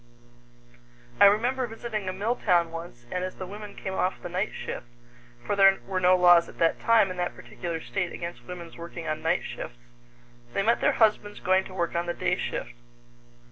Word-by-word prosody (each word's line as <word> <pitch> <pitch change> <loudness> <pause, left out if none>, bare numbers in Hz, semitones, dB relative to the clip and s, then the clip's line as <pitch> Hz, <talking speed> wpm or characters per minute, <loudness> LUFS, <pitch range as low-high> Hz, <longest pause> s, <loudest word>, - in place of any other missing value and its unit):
I - - +9
remember 240 +5 +3
visiting 220 -3 -4
a - - -1
mill 205 +6 -1
town 175 -7 +2
once, 165 -8 -8
and 180 - -2
as 185 - -4
the 185 - -6
women 205 +2 -9
came 190 - -5
off 185 0 0
the - - -7
night 185 +4 -1
shift 120 - -6 0.6
for 205 - 0
there 195 -1 +6
were 190 -1 -1
no 185 0 +5
laws 175 -1 +6
at - - -14
that 165 -1 +2
time 225 -4 +4
in 185 - -6
that 175 0 -2
particular 170 -2 -5
state 180 +1 -3
against 170 -9 -7
women's 170 -2 -8
working 170 0 -7
on 155 0 -2
night 165 +2 +1
shifts 120 - -7 0.8
they 195 - +2
met 230 +3 +2
their - - +3
husbands 210 -2 +2
going 190 +1 +2
to 185 - -10
work 170 -2 -1
on 170 0 -1
the 175 - -2
day 180 0 +1
shift. 120 - -4
185 Hz, 200 wpm, -27 LUFS, 170-205 Hz, 0.8 s, I